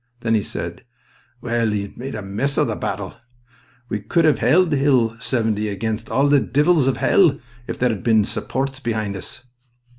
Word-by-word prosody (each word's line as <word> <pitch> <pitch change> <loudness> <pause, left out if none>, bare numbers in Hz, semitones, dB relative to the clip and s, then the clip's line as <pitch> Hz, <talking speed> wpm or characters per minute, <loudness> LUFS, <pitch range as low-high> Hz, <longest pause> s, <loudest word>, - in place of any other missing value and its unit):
Then 115 -1 0
he 110 - +3
said: - - -6 0.6
"Well, 120 -2 0
he's 100 -1 -3
made 130 +1 -6
a 105 - -5
mess 110 +9 -1
o' - - +3
the - - -2
battle. - - -4 0.7
We 105 - -3
could've 155 - +2
held 180 -1 +3
Hill 130 -5 +2
70 110 -3 0
against 110 +2 -3
all 135 +5 +2
the 145 0 +5
di'els 150 0 +2
o' 135 - +2
hell 165 -8 +3 0.3
if - - -4
there 125 - +2
had 110 -4 -3
bin 110 -3 +3
supports 135 +3 -3
behind 110 -5 -2
us." 100 +6 -8
120 Hz, 175 wpm, -21 LUFS, 110-140 Hz, 0.7 s, the